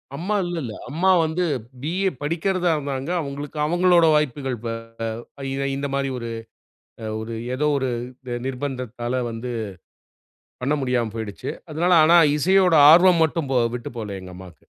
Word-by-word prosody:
அம்மா 190 +7 -2
இல்ல 175 -1 -3
இல்ல. 110 -3 -5 0.2
அம்மா 175 +6 +2
வந்து 160 +3 -1 0.4
பி.ஏ. 185 +5 0
படிக்கிறதா 175 +3 0
இருந்தாங்க. 140 +1 -4
அவங்களுக்கு, 145 +1 -6
அவங்களோட 175 +1 +4
வாய்ப்புகள் 135 -3 -1
ப - - -1 0.8
இ - - -2 0.2
இந்த 140 0 -2
மாரி 135 -1 -1
ஒரு, 115 -1 -5 0.7
அ - - -6 0.2
ஒரு 115 +1 -5 0.2
எதோ 150 +2 +1
ஒரு 130 -1 -1 0.4
நி 120 - -2
நிர்பந்தத்தால 125 -2 -3
வந்து, 115 +2 -5 1.1
பண்ண 140 +4 +1
முடியாம 120 -4 0
போயிடுச்சு. 110 -3 -5 0.2
அதனால 170 +4 +1
ஆனா 170 +2 +6 0.2
இசையோட 185 +2 +4 0.2
ஆர்வம் 175 -1 +6
மட்டும் 155 -3 -2
போ 125 - +3 0.2
விட்டு 120 - -7
போகல 100 -3 -5
எங்க 90 0 -10
அம்மாக்கு. 90 -3 -12
140 Hz, 145 wpm, -23 LUFS, 125-170 Hz, 1.1 s, ஆனா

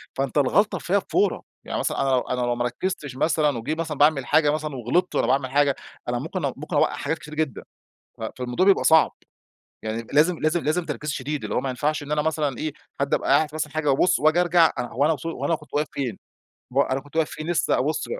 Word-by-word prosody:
فأنت 135 +1 -2
الغلطة 190 +9 +3
فيها 200 +3 +1
بفورة، 200 0 0 0.2
يعني - - -3
مثلًا - - -1
أنا 135 - +1
لو 130 - +4
أنا 125 0 -3
لو 120 0 0
ما 120 0 -1
ركزتش 145 0 -3
مثلًا 150 -2 +1
وجه 145 +8 -2
مثلًا 160 -2 -4
باعمل 145 -2 +4
حاجة 150 +3 +3
مثلًا 155 -1 -3
وغلطت 130 +10 0
وأنا - - +2
باعمل 135 -1 +1
حاجة 145 -1 +3 0.3
أنا - - -1
ممكن - - -3
أ - - -1
ممكن - - -6
أوقع - - +3
حاجات 160 - -2
كتيرة 150 0 -10
جدًا، 155 -6 -2 0.6
ف - - -9
فالموضوع 125 +8 0
بيبقى 195 - +4
صعب، 160 -1 +5 0.7
يعني 110 +1 -4
لازم 160 +4 +4
لازم 155 +2 +1
لازم 165 +3 0
تركيز 150 -1 -4
شديد 140 +2 -4
اللي - - -3
هو - - +1
ما 135 - -3
ينفعش 145 +4 -1
إن 145 - -8
أنا 150 0 +2
مثلًا 150 -4 -1
إيه، 155 -2 -3 0.3
حد 140 0 0
أبقى - - 0
قاعد 155 -1 0
مثلًا 150 -1 -3
حاجة 155 -2 +1
وأبص 175 +6 +3
وأجي 155 +4 +4
أرجع 175 -2 +4
هو 125 +3 0
أنا 160 - +3
وص 155 - -8
هو 165 - -3
أنا 165 - +2
كنت 150 -1 -15
واقف 150 +1 +1
فين؟ 125 -7 -3 0.5
وه 140 +1 +2
أنا 130 - +1
كنت 145 +2 -17
واقف 160 -2 +2
فين؟ 155 +2 -6
لسه 170 - +1
أبص 470 - -1
150 Hz, 235 wpm, -24 LUFS, 135-160 Hz, 0.7 s, صعب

